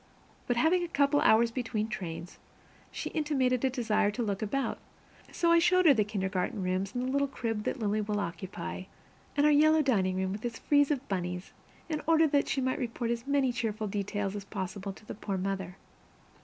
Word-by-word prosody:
But 245 - +1
having 340 +7 +3
a - - -2
couple 285 -2 +2
of - - +3
hours 230 +1 +5
between 230 -3 -2
trains, 175 -4 -6 0.5
she - - -5
intimated 265 -5 +1
a 265 - +3
desire 220 -5 +1
to 235 +4 -2
look 200 -2 -2
about, 270 +6 -1 0.5
so 340 -1 +2
I 335 - +6
showed 365 +2 +4
her 300 - +8
the 220 -4 +2
kindergarten 190 -1 -2
rooms 185 +3 -1
and 245 - -1
the 260 - -1
little 280 +1 +2
crib 225 -5 -3
that - - -1
Lily 215 -2 0
will 210 0 -1
occupy, 180 0 -5 0.5
and 290 - +4
our 300 - +6
yellow 310 +1 +5
dining 190 -9 +1
room, 190 0 -1
with 205 +2 -5
its 235 -1 -3
frieze 285 -1 +3
of 275 -2 -1
bunnies, 180 -1 -3 0.3
in 310 -2 -2
order 325 0 +5
that 285 0 +2
she 270 - 0
might 260 0 0
report 235 -1 -2
as 235 +2 -3
many 280 -2 +2
cheerful 225 -2 -2
details 200 0 -2
as 205 - -5
possible 195 0 -5
to 195 - -15
the - - -6
poor 200 -2 -4
mother. 190 -1 -3
225 Hz, 205 wpm, -30 LUFS, 195-275 Hz, 0.5 s, her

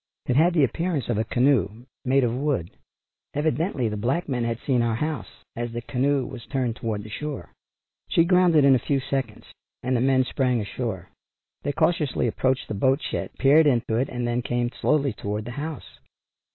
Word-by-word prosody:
It 125 - 0
had 170 +5 +4
the 155 - +4
appearance 165 +1 -1
of 115 -3 +1
a - - +2
canoe, 120 -3 +1 0.2
made 135 +1 +3
of 120 -1 0
wood. 130 - -1 0.6
Evidently 150 - 0
the 105 -1 -3
black 130 +12 -1
men 125 -4 -1
had 115 -1 -1
seen 130 -4 +2
our 115 -1 +1
house 150 0 -4
as 120 0 -3
the 120 - -3
canoe 135 +2 0
was 125 -3 -8
turned 125 -4 -1
toward 110 -4 -3
the 110 - -10
shore. 150 +5 -6 0.6
She 165 - +4
grounded 175 -5 +5
in 140 - +7
a 130 - +4
few 140 +2 0
seconds, 135 0 -4 0.3
and 130 +1 0
the 120 - +1
men 130 0 +3
sprang 125 -2 0
ashore. 100 -3 -4 0.5
They 145 - -1
cautiously 150 -2 +1
approached 130 +3 0
the - - -4
boat 130 +7 +2
shed - - -3
peered 150 +3 +5
into 120 -4 +1
it, 130 +2 0
and 125 -1 -3
then 120 +1 0
came 120 0 -1
slowly 140 -3 +1
toward 105 +1 -4
the 120 - -6
house. 150 +3 -7
130 Hz, 190 wpm, -25 LUFS, 120-145 Hz, 0.6 s, in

